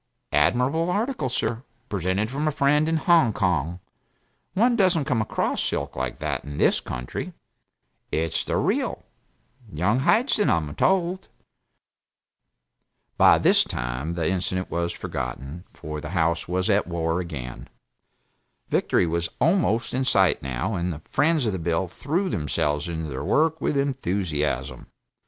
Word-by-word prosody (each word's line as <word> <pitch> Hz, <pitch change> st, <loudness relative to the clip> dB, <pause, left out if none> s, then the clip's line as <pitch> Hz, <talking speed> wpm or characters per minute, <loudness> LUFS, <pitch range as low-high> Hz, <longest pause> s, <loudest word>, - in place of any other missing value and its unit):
Admirable 125 Hz, -, +2 dB
article, 215 Hz, -, -1 dB
sir 120 Hz, -1 st, -2 dB, 0.3 s
present 100 Hz, +3 st, -1 dB
from 145 Hz, +3 st, -1 dB
a -, -, +2 dB
friend 150 Hz, +2 st, +2 dB
in 165 Hz, -, +2 dB
Hong 165 Hz, -7 st, +4 dB
Kong; 90 Hz, -4 st, 0 dB, 0.8 s
one 235 Hz, +4 st, +4 dB
doesn't 185 Hz, -8 st, +3 dB
come 130 Hz, -6 st, +1 dB
across 110 Hz, -, -1 dB
silk -, -, -2 dB
like 65 Hz, -1 st, -3 dB
that -, -, -3 dB
in 75 Hz, 0 st, -7 dB
this -, -, +3 dB
country 60 Hz, 0 st, -5 dB, 0.8 s
it's 80 Hz, 0 st, 0 dB
the -, -, -1 dB
real -, -, 0 dB, 0.7 s
Young 95 Hz, +10 st, +1 dB
Hyson, 210 Hz, -, +3 dB
I'm 75 Hz, -3 st, 0 dB
told." 185 Hz, -, +1 dB, 1.9 s
By -, -, +7 dB
this -, -, +4 dB
time 65 Hz, +7 st, -4 dB
the 85 Hz, -2 st, 0 dB
incident 95 Hz, 0 st, -1 dB
was 85 Hz, 0 st, -1 dB
forgotten, 70 Hz, +4 st, -5 dB
for 75 Hz, 0 st, -7 dB
the 75 Hz, -, -6 dB
House 85 Hz, 0 st, +1 dB
was 90 Hz, +1 st, -1 dB
at 105 Hz, -1 st, +2 dB
war 85 Hz, 0 st, -1 dB
again. 65 Hz, -9 st, -6 dB, 1.0 s
Victory -, -, +2 dB
was 85 Hz, 0 st, -1 dB
almost 160 Hz, -, +2 dB
in 130 Hz, +1 st, 0 dB
sight, 95 Hz, -7 st, +3 dB
now, 65 Hz, -, -2 dB
and 90 Hz, -1 st, -1 dB
the 80 Hz, -1 st, -7 dB
friends 150 Hz, -1 st, +2 dB
of 110 Hz, -, 0 dB
the 95 Hz, -, -3 dB
bill 85 Hz, +3 st, 0 dB
threw 160 Hz, -, -2 dB
themselves 75 Hz, -, -1 dB
into 80 Hz, -2 st, -4 dB
their 65 Hz, -3 st, -5 dB
work 160 Hz, +1 st, +2 dB
with 145 Hz, -, 0 dB
enthusiasm. 95 Hz, -, -1 dB
95 Hz, 140 wpm, -25 LUFS, -, 1.9 s, By